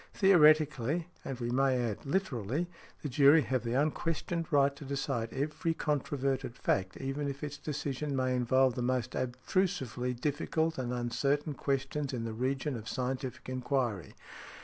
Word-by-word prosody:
Theoretically, 155 - +4
and 130 -2 -5
we 120 -1 -2
may 135 0 +3
add, 120 0 -2
literally, 140 - -1 0.4
the - - -1
jury 145 +3 +6
have 130 0 -1
the 120 +1 -1
unquestioned 165 +3 -1
right 140 -1 +4
to 145 - -10
decide 135 -4 -2
every 150 +4 -1
controverted 135 -4 -1
fact, 95 -1 0
even 135 +2 -3
if 140 +1 -5
its 145 0 -5
decision 145 -1 -3
may 130 -1 +1
involve 130 +1 +3
the 125 - -3
most 125 0 0
abstrusively 130 - -1
difficult 160 +2 0
and 125 -1 -2
uncertain 140 +5 0
questions 140 +1 -2
in 120 -2 -2
the 115 -1 -3
regions 130 +3 -1
of 110 0 -7
scientific 130 0 -3
enquiry. 125 - -1
135 Hz, 150 wpm, -31 LUFS, 125-150 Hz, 0.4 s, jury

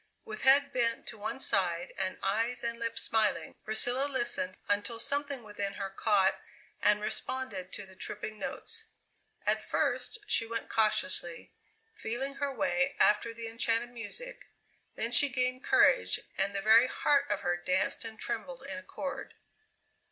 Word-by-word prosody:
With 215 0 -7
head 280 +1 +5
bent 235 -2 0
to 220 - -10
one 215 +5 -4
side 175 -7 +1
and 190 -1 -2
eyes 225 +5 0
and 235 0 -2
lips 230 0 -2
smiling, 210 -7 +1
Priscilla 245 +5 +2
listened 240 -8 0
until 205 +3 0
something 280 +1 0
within 205 -2 -4
her 195 -1 -5
caught 195 -1 +2 0.4
and 210 0 +4
responded 210 -3 -3
to 205 - -7
the 190 0 -17
tripping 210 +3 -5
notes. 450 +11 -3 0.6
At - - +1
first - - -1
she 230 - +4
went 230 0 -4
cautiously, 185 -5 0 0.4
feeling 270 - -4
her 285 0 -1
way 275 0 0
after 215 +2 +3
the 230 0 -7
enchanted 230 +1 +1
music, - - -6 0.5
then 230 +2 -3
she 285 +3 +7
gained 255 0 -1
courage, - - +4 0.2
and 200 +1 0
the 195 - -1
very 225 +3 +7
heart 280 +2 +1
of 205 - -1
her 175 - 0
danced 180 +2 0
and 225 -1 -8
trembled 260 +3 -5
in 275 0 -6
accord. 280 0 -6
230 Hz, 150 wpm, -31 LUFS, 205-265 Hz, 0.6 s, she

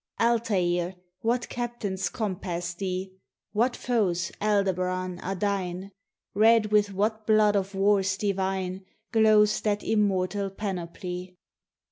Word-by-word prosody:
Altair, 190 -7 +1 0.2
what 240 +2 0
captains 215 -7 -3
compass 180 -5 -3
thee? 185 +1 -4 0.4
What 240 +4 +1
foes, 195 -8 0
Aldebaran, 185 -3 0
are 195 +1 -3
thine? 195 -1 -2 0.4
Red 220 +1 +4
with 205 -1 +3
what 215 +2 -1
blood 215 -1 +4
of 195 0 -1
wars 195 -1 +2
divine 190 -2 -2 0.3
Glows 215 -2 +4
that 205 -1 0
immortal 200 -2 +1
panoply? 180 -2 -5
195 Hz, 105 wpm, -27 LUFS, 185-215 Hz, 0.4 s, Red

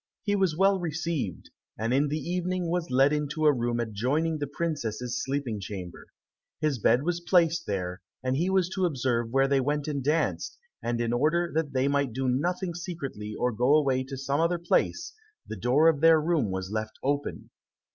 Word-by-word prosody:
He 205 0 +1
was 190 -6 +1
well 195 +1 +4
received, 160 - -3 0.3
and 115 +3 -1
in 140 +3 +3
the 150 +2 -1
evening 180 +2 -2
was 175 -1 -1
led 135 +3 +4
into 150 +1 -1
a 150 - +6
room 120 -1 -1
adjoining 130 +9 0
the 145 - -2
princesses' 125 -6 -3
sleeping 135 -6 -2
chamber. 95 -3 -7 0.5
His 150 -5 0
bed 120 +5 +3
was 175 +1 -1
placed 170 -2 +2
there, 90 -3 -3 0.2
and 130 0 0
he 170 +6 +1
was 190 -2 +2
to 190 0 0
observe 125 -6 -1
where 135 +2 +3
they 140 0 +3
went 145 +2 -1
and 140 -3 -2
danced, 155 +4 0 0.2
and 120 0 -2
in 120 0 0
order 165 +7 +1
that 155 -3 -1
they 130 +1 +2
might 140 -3 0
do 130 +2 -1
nothing 175 +7 0
secretly 140 - -6
or 125 - +1
go 125 +6 +3
away 135 -4 +2
to 135 0 -7
some 140 +2 -1
other 170 +2 +2
place, 170 0 0 0.3
the - - -6
door 125 - +3
of 155 -3 +3
their 165 -1 +7
room 155 - +1
was 95 0 -4
left 110 0 -3
open. 145 +1 -2
140 Hz, 190 wpm, -27 LUFS, 125-165 Hz, 0.5 s, their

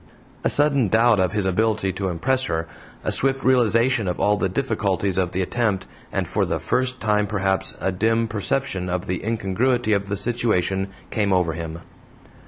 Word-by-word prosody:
A - - +2
sudden 140 -5 +4
doubt 115 +1 +4
of 95 -1 +2
his 105 -2 0
ability 100 0 +1
to 95 +1 -3
impress 125 +10 0
her, 80 0 -2 0.4
a - - -1
swift 135 0 +1
realization 120 -2 +3
of 90 - -2
all 105 - +3
the 95 - -1
difficulties 100 -5 -1
of 90 -1 0
the 95 - -1
attempt, 100 -2 -1 0.3
and, - - -1
for - - 0
the - - -1
first 130 0 -1
time 105 -1 +1
perhaps, 95 -2 -1
a 95 - 0
dim 115 +4 +1
perception 100 -3 -2
of 90 0 -2
the 90 -1 -3
incongruity 115 +2 0
of 100 -1 -1
the 100 - -1
situation 100 -4 0 0.2
came 105 -3 0
over 90 -3 +2
him. 80 +1 -6
105 Hz, 180 wpm, -22 LUFS, 95-115 Hz, 0.4 s, sudden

